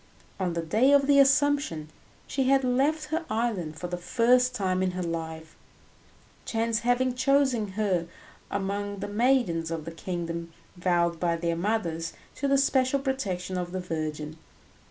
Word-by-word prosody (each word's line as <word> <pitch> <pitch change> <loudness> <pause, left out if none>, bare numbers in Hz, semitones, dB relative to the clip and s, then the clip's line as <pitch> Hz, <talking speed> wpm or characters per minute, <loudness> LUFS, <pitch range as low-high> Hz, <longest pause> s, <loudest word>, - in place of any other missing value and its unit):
On 180 -2 -1
the 170 0 -2
day 220 - +3
of 280 -1 +5
the 280 0 +5
Assumption 275 - +3 0.4
she 270 -1 -1
had 270 +1 +4
left 285 +5 +1
her 325 +2 -1
island 215 -9 -1
for 175 - -6
the 175 0 -4
first 250 +6 +3
time 185 -4 0
in 185 -1 0
her 180 - -2
life, 160 -1 -5 0.9
chance 230 0 0
having 245 +2 +1
chosen 260 -6 +2
her 185 -5 0 0.4
among 200 +1 -2
the 200 +1 -4
maidens 210 -7 +1
of 165 -2 -4
the 165 - -5
kingdom 170 -1 -5 0.2
vowed 175 -2 +1
by 170 -1 +1
their 170 0 -1
mothers 170 -4 -1 0.2
to 280 - -1
the 275 0 +4
special 270 0 +2
protection 195 -10 -2
of 175 0 -5
the 185 - -2
Virgin. 155 -3 -4
200 Hz, 155 wpm, -27 LUFS, 170-255 Hz, 0.9 s, of